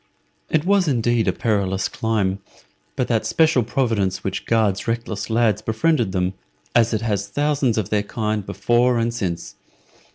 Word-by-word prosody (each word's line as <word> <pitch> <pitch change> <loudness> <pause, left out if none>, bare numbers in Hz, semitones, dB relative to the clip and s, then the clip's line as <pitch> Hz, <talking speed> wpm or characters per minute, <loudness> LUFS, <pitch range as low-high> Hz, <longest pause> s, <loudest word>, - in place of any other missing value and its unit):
It 155 +1 +1
was 195 -2 +3
indeed 120 -4 +1
a - - +4
perilous 100 -4 0
climb, 100 -4 -1 0.6
but - - -1
that - - +1
special 160 -5 +3
providence 110 -5 -1
which - - -4
guards 110 -4 +1
reckless 115 -3 -3
lads 115 -3 +2
befriended 115 -1 +1
them, 90 0 0 0.4
as 115 -1 +4
it 110 -2 -1
has 105 -3 -1
thousands 145 0 0
of 105 -5 -1
their 105 -1 +2
kind 105 0 -2
before 120 +4 +1
and 115 0 0
since. 90 - -4
115 Hz, 155 wpm, -21 LUFS, 100-120 Hz, 0.6 s, a